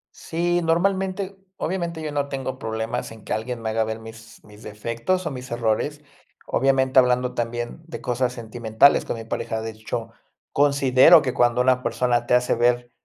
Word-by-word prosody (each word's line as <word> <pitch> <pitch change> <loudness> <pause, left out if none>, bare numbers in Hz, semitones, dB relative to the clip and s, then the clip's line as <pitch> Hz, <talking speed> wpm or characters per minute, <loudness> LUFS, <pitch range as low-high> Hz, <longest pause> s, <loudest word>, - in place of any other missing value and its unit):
Sí, 175 +1 -1
normalmente 190 +3 0 0.2
obviamente 170 -2 -3
yo 150 - -3
no 140 -1 -2
tengo 130 -1 -4
problemas 110 -1 -3
en 110 -1 -13
que - - -2
alguien 115 +1 -4
me 110 - -1
haga 110 0 +1
ver 110 0 -4
mis 110 0 -13
mis 105 0 -16
defectos, 115 - -3
o 155 - -2
mis 125 -1 -8
errores. 120 +6 -1 0.4
Obviamente 130 -1 +3
hablando 125 0 +2
también 120 +5 -4
de - - -7
cosas 125 0 -1
sentimentales 115 +2 +2
con 115 - -3
mi 115 - -7
pareja. 110 0 -3
De 110 0 -4
hecho, 110 0 -6 0.4
considero 140 +2 +5
que 130 - -2
cuando 120 0 +2
una 125 0 +3
persona 120 -2 0
te 125 - +4
hace 125 0 +2
ver 120 +1 +1
125 Hz, 175 wpm, -23 LUFS, 115-145 Hz, 0.4 s, considero